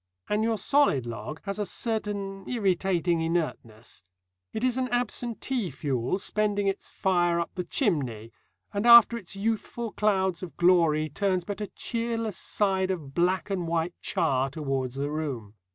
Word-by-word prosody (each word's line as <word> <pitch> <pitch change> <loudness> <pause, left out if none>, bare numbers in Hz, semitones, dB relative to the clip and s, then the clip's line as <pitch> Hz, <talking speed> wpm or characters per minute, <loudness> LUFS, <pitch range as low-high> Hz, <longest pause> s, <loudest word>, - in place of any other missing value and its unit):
And 210 +1 +1
your 225 0 +1
solid 205 - +3
log 120 +6 -6
has 200 0 -4
a 210 - 0
certain 200 -3 -3
irritating 185 -6 +1
inertness. 130 - -3 0.5
It 220 - -4
is 255 -1 +2
an 255 -1 -1
absentee 245 -2 -1
fuel, 130 +1 -1
spending 205 0 0
its 195 0 -2
fire 175 -3 +1
up 170 - -2
the 180 -1 -4
chimney, 130 - -1 0.4
and 205 +3 0
after 235 0 +9
its 200 -4 -6
youthful 225 +2 -2
clouds 190 -4 +1
of 180 -3 -8
glory 165 -4 +4
turns 185 +4 0
but 205 +2 -5
a 210 - -2
cheerless 230 -3 -3
side 190 -2 0
of 155 -8 -4
black 185 +5 +1
and 180 -3 -1
white 165 +1 0
char 130 0 +1
towards 135 -3 -3
the 140 +1 -2
room. 135 -10 -4
185 Hz, 150 wpm, -27 LUFS, 155-210 Hz, 0.5 s, after